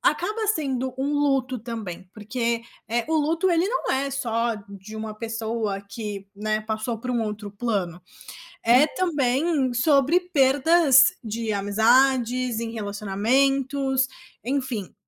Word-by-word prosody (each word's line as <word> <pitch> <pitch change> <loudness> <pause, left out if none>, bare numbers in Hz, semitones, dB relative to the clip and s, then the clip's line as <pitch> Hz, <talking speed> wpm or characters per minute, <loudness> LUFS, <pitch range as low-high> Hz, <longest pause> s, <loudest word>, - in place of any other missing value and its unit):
acaba 425 +8 0
sendo 265 - -1
um 275 +2 -1
luto 270 -3 +1
também, 210 -6 -7
porque, 230 +2 -2 0.3
eh, 235 +1 0
o 320 - +2
luto, 325 +5 +1
ele 340 +2 +2
não - - -1
é 275 +1 0
só 235 -3 -1
de 200 +2 -11
uma 220 0 -5
pessoa 225 -2 -3
que, 200 -1 -7
né, 215 +1 -1
passou 220 +1 -3
para 250 +1 -4
um 240 -2 0
outro 210 -1 -5
plano, 200 -5 -2 0.6
é 250 +6 +6
também 285 -4 +1
sobre 280 +5 +3
perdas 285 -3 +4
de 225 0 -3
amizades 240 +4 +2
em 230 -1 -4
relacionamentos, 260 +6 0 0.4
enfim. 255 -7 -2
245 Hz, 125 wpm, -24 LUFS, 215-275 Hz, 0.6 s, é